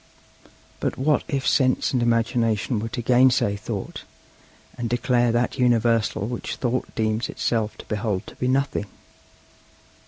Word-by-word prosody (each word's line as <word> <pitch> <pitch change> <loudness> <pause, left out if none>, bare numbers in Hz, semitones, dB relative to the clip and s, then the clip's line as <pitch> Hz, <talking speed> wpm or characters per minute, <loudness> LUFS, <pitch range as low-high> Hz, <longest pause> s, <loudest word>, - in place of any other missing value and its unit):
But - - -2
what 145 +3 +2
if 135 -1 -2
Sense 130 -1 +2
and 125 - +1
Imagination 115 0 +1
were 115 +2 -4
to 120 - -4
gainsay 125 -4 +4
Thought, 100 -1 -5 0.7
and 120 -2 -3
declare 120 0 +2
that 120 +3 0
universal 115 -4 +2
which 120 +2 -4
Thought 125 0 -2
deems 110 0 0
itself 110 -2 -1
to - - -11
behold 105 -3 -2
to - - -12
be 125 - -1
nothing? 135 -5 0
120 Hz, 135 wpm, -24 LUFS, 110-125 Hz, 0.7 s, gainsay